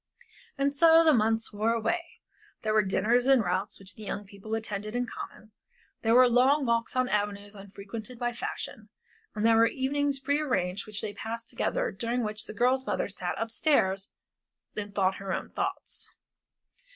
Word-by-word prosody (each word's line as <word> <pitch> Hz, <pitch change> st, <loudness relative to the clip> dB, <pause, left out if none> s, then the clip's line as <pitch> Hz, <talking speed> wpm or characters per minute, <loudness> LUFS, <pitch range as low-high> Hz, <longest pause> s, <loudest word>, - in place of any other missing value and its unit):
And 280 Hz, +1 st, +1 dB
so 330 Hz, +2 st, +7 dB
the 315 Hz, -1 st, +6 dB
months 225 Hz, -1 st, +1 dB
wore 215 Hz, +3 st, +1 dB
away. 330 Hz, +10 st, 0 dB, 0.6 s
There 215 Hz, -1 st, +1 dB
were 215 Hz, -, +5 dB
dinners 230 Hz, +5 st, +2 dB
and 265 Hz, -4 st, +5 dB
routs 185 Hz, +2 st, -1 dB
which 195 Hz, 0 st, -7 dB
the -, -, -13 dB
young 205 Hz, 0 st, -4 dB
people 200 Hz, +2 st, -6 dB
attended 215 Hz, 0 st, -4 dB
in 245 Hz, 0 st, 0 dB
common, 220 Hz, -2 st, -9 dB, 0.5 s
there 225 Hz, +1 st, +3 dB
were 255 Hz, 0 st, +8 dB
long 265 Hz, +4 st, +4 dB
walks 235 Hz, 0 st, 0 dB
on 255 Hz, 0 st, +2 dB
avenues 205 Hz, -1 st, -2 dB
unfrequented 205 Hz, +4 st, -8 dB
by 240 Hz, 0 st, -1 dB
fashion, 220 Hz, -2 st, -6 dB, 0.5 s
and 215 Hz, +1 st, 0 dB
there 225 Hz, 0 st, +6 dB
were 230 Hz, 0 st, +6 dB
evenings 280 Hz, +2 st, 0 dB
prearranged 260 Hz, -10 st, 0 dB
which 210 Hz, -1 st, -4 dB
they 210 Hz, -, -3 dB
passed 230 Hz, +2 st, -6 dB
together -, -, 0 dB
and -, -, -13 dB
during 240 Hz, +1 st, 0 dB
which 210 Hz, 0 st, -3 dB
the -, -, -8 dB
girl's 260 Hz, +3 st, +2 dB
mother -, -, -1 dB
sat 180 Hz, -2 st, -3 dB
up 225 Hz, +1 st, -3 dB
stairs 195 Hz, -8 st, +1 dB, 0.6 s
and 205 Hz, -1 st, -5 dB
thought 190 Hz, -1 st, +2 dB
her 195 Hz, -1 st, -5 dB
own -, -, -3 dB
thoughts. -, -, -4 dB
225 Hz, 175 wpm, -28 LUFS, 205-255 Hz, 0.6 s, were